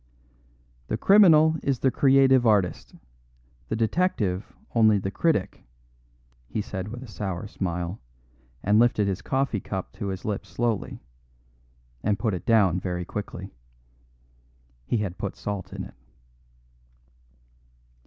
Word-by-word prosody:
"The 110 - -1
criminal 160 - +6
is 140 -2 0
the 130 +2 +2
creative 135 -2 +4
artist; 100 -5 +1 0.7
the - - -1
detective 110 - 0 0.2
only 110 -3 +5
the 95 0 -3
critic," 130 - 0 0.8
he 110 - -3
said 95 -2 -4
with 120 +4 -7
a - - -10
sour 95 -2 -4
smile, 90 -2 -4 0.6
and 105 +3 +4
lifted 115 -4 +3
his 100 0 -2
coffee 130 -5 -1
cup 95 0 -5
to 100 - -5
his 95 -1 -5
lips 105 -2 -3
slowly, 115 - -2 1.0
and 105 -1 +1
put 110 -1 -1
it 90 - -5
down 100 -6 +4
very 90 -1 -3
quickly. 105 +3 -6 1.3
He - - +1
had 100 -4 -3
put 100 - -4
salt 100 -2 -5
in - - -5
it. - - -10
105 Hz, 125 wpm, -25 LUFS, 95-120 Hz, 1.3 s, criminal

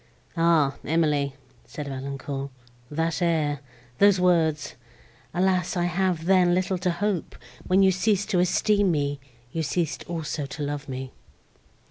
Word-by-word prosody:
"Ah 165 -5 +3
Emily!" 150 -4 +1 0.3
said 150 -1 -7
Valancourt, 135 0 -5 0.4
"that 165 +4 -1
air, 155 -4 +1 0.4
those 200 -2 +6
words—alas! 165 +1 -1
I 175 - +1
have, 175 -1 0
then, 180 -1 +4
little 185 0 0
to 180 0 0
hope—when 190 0 -1
you 190 - +6
ceased 200 +1 +1
to 180 - +3
esteem 200 +3 +3
me, 145 -3 0 0.3
you 165 - -2
ceased 160 +1 -1
also 155 -4 -3
to 150 - -6
love 145 0 -4
me!" 130 0 -5
165 Hz, 125 wpm, -25 LUFS, 145-180 Hz, 0.4 s, those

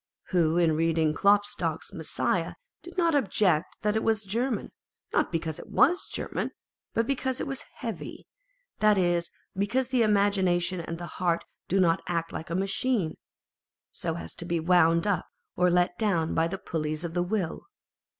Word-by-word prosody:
Who 170 -3 +2
in 170 -2 +4
reading 160 -1 +2
Klopstock's 205 +3 +1
Messiah - - -1 0.3
did 355 - -12
not 335 -2 +3
object 195 - +2
that 210 0 +1
it 220 - +2
was 220 -1 +1
German, 230 +3 -1 0.4
not - - +2
because 165 -2 -2
it - - -10
was 360 +6 +3
German, - - -3 0.5
but 230 - +2
because 260 0 -1
it - - -2
was 270 -2 -4
heavy; - - -6 0.5
that 210 -1 +5
is, 175 -2 +1 0.3
because 235 +7 0
the 255 -2 +2
imagination 190 -4 +2
and 165 0 -5
the 175 - -6 0.2
heart 170 -2 +1 0.2
do 195 - +2
not 170 -1 +3
act 165 -1 -1
like 160 - -6
a 170 - -2
machine, 195 -1 0 0.8
so 165 -2 -3
as 170 - -6
to 175 - -4
be 170 -1 0
wound 165 0 +4
up 200 -5 0 0.3
or 180 0 +3
let 175 0 +2
down 175 -7 +1
by 165 0 +2
the 195 +3 -4
pulleys 155 -2 -3
of 170 -1 -4
the 175 - +1
will 180 -2 -2
180 Hz, 170 wpm, -28 LUFS, 165-215 Hz, 0.8 s, that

